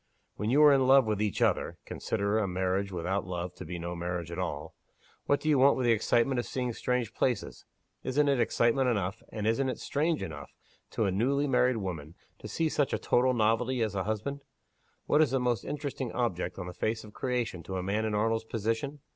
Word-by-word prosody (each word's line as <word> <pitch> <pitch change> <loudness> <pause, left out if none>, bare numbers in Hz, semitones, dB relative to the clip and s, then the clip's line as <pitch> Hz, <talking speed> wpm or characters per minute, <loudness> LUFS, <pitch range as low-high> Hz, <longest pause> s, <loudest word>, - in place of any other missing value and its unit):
When 105 - -2
you 145 +5 +5
are 145 -1 +8
in 135 -2 +3
love 135 -1 +7
with 105 -1 -1
each 105 -2 0
other - - +1
(consider 100 +2 -1
a 105 - 0
marriage 95 +2 -1
without 95 +2 -1
love 90 0 -4
to - - -9
be 90 +2 -5
no 85 +1 -5
marriage 85 -1 -4
at 85 - -5
all), - - -4 0.5
what 145 - +3
do - - -6
you 150 -3 +4
want 140 +2 +5
with 130 - 0
the 120 - +4
excitement 120 +3 +2
of 120 - -3
seeing 125 -2 -2
strange 125 -1 -1
places? 125 -5 -1 0.4
Isn't 145 +3 +2
it 140 -3 +2
excitement 120 +2 +2
enough, 100 -2 -1
and 105 -2 -4
isn't 130 +5 +1
it - - -3
strange 155 +2 -1
enough, 75 -3 -8 0.3
to 110 - -1
a 95 - +1
newly 135 +9 +1
married 125 -2 +3
woman 85 -6 -5 0.2
to - - -8
see 165 - 0
such 145 -2 0
a - - +2
total 125 +1 +2
novelty 115 +2 +2
as 110 -3 -2
a 95 -2 -2
husband? 110 +7 -3 0.6
What 150 - +4
is 155 - +4
the 135 +1 +1
most 125 -4 0
interesting 140 -4 -4
object 115 -8 -2
on - - -5
the 90 - -7
face 110 +4 -2
of 105 -1 -13
creation 125 -8 -2
to 95 +3 -5
a 90 - -3
man 100 +4 0
in 110 -1 -1
Arnold's 110 +1 +1
position? 115 +6 -2
115 Hz, 220 wpm, -29 LUFS, 95-130 Hz, 0.6 s, are